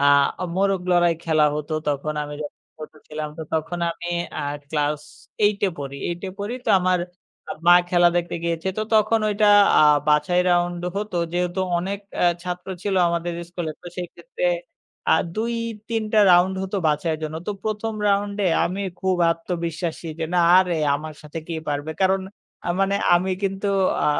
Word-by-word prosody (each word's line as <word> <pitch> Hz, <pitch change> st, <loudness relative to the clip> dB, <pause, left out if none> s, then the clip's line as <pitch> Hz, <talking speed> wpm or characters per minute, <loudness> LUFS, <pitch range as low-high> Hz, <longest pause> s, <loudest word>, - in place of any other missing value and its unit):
আ -, -, +2 dB, 0.5 s
মোরগ 195 Hz, 0 st, +1 dB
লড়াই 175 Hz, -1 st, +4 dB
খেলা 155 Hz, -2 st, +3 dB
হতো 150 Hz, +1 st, -4 dB, 0.2 s
তখন 145 Hz, +1 st, -1 dB
আমি 145 Hz, 0 st, -6 dB
যখন 145 Hz, -, -9 dB, 0.2 s
ছোট 155 Hz, -, -9 dB, 0.2 s
ছিলাম 150 Hz, 0 st, -4 dB
তো -, -, -3 dB
তখন 160 Hz, +2 st, -1 dB
আমি 170 Hz, +1 st, -7 dB, 0.3 s
আ -, -, -3 dB, 0.3 s
class 150 Hz, -1 st, 0 dB, 0.4 s
8 205 Hz, -1 st, +3 dB
এ -, -, +2 dB
পড়ি। 140 Hz, -1 st, -6 dB
8 175 Hz, 0 st, -4 dB
এ -, -, -5 dB
পড়ি 205 Hz, +4 st, -3 dB
তো 220 Hz, -, +3 dB
আমার 185 Hz, 0 st, +2 dB, 0.7 s
মা 175 Hz, -, +9 dB, 0.2 s
খেলা 175 Hz, -1 st, +5 dB
দেখতে 175 Hz, 0 st, -1 dB
গিয়েছে। 170 Hz, +2 st, -1 dB
তো 215 Hz, -, +1 dB
তখন 215 Hz, +1 st, +4 dB
ওইটা 210 Hz, 0 st, +2 dB, 0.3 s
আ -, -, +6 dB, 0.3 s
বাছাই 150 Hz, +4 st, +3 dB
round 175 Hz, 0 st, +1 dB, 0.2 s
হতো। 210 Hz, -2 st, -3 dB, 0.2 s
যেহেতু 180 Hz, +1 st, -1 dB, 0.2 s
অনেক 195 Hz, +3 st, -3 dB, 0.2 s
অ্যা -, -, +4 dB, 0.2 s
ছাত্র 180 Hz, +1 st, -5 dB
ছিল 200 Hz, -2 st, -1 dB
আমাদের 170 Hz, 0 st, -2 dB, 0.2 s
school 175 Hz, -1 st, -5 dB
এ -, -, -5 dB
তো -, -, -11 dB
সেক্ষেত্রে 480 Hz, -, -6 dB, 0.7 s
আর -, -, +5 dB
আ -, -, -7 dB
২-৩ 230 Hz, 0 st, -3 dB
টা 215 Hz, -, +4 dB
round 180 Hz, +2 st, +5 dB
হত 190 Hz, +2 st, -5 dB
বাছাইয়ের 155 Hz, +1 st, 0 dB
জন্য। 155 Hz, +1 st, -4 dB
তো -, -, -1 dB
১ম 220 Hz, +1 st, -2 dB, 0.2 s
round-এ 200 Hz, 0 st, 0 dB, 0.2 s
আমি 190 Hz, +3 st, -3 dB, 0.2 s
খুব 190 Hz, -1 st, +1 dB
আত্মবিশ্বাসী 165 Hz, 0 st, -3 dB
যে 165 Hz, -, -1 dB
না -, -, +4 dB, 0.2 s
আরে 180 Hz, -2 st, +2 dB, 0.2 s
আমার 155 Hz, +1 st, -5 dB
সাথে 150 Hz, +2 st, -7 dB
কে 165 Hz, -, -3 dB
পারবে? 145 Hz, +2 st, -2 dB
কারণ 190 Hz, 0 st, +3 dB, 0.4 s
আ -, -, -1 dB
মানে 195 Hz, +1 st, +2 dB, 0.2 s
আমি 185 Hz, +2 st, +1 dB
কিন্তু 195 Hz, +1 st, -1 dB, 0.4 s
আ -, -, +2 dB
175 Hz, 175 wpm, -23 LUFS, 160-200 Hz, 0.7 s, মা